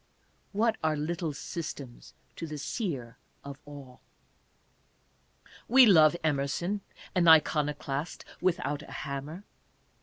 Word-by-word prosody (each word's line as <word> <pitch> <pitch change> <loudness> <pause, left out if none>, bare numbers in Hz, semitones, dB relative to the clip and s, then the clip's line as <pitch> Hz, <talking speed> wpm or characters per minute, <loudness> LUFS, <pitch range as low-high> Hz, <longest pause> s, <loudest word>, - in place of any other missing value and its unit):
What 220 +2 +1
are 155 -1 +2
little 160 +2 -2
systems 145 -4 -7 0.2
to 165 - -6
the 155 -1 -6
Seer 145 - -4 0.3
of 140 0 -9
All? 140 -3 -12 1.7
We 260 +2 +8
love 160 -6 +6
Emerson, 155 +7 -1 0.3
"an 175 -2 +2
iconoclast 150 -1 +2 0.2
without 165 -5 0
a - - -12
hammer." 145 +6 -6
155 Hz, 100 wpm, -29 LUFS, 140-175 Hz, 1.7 s, We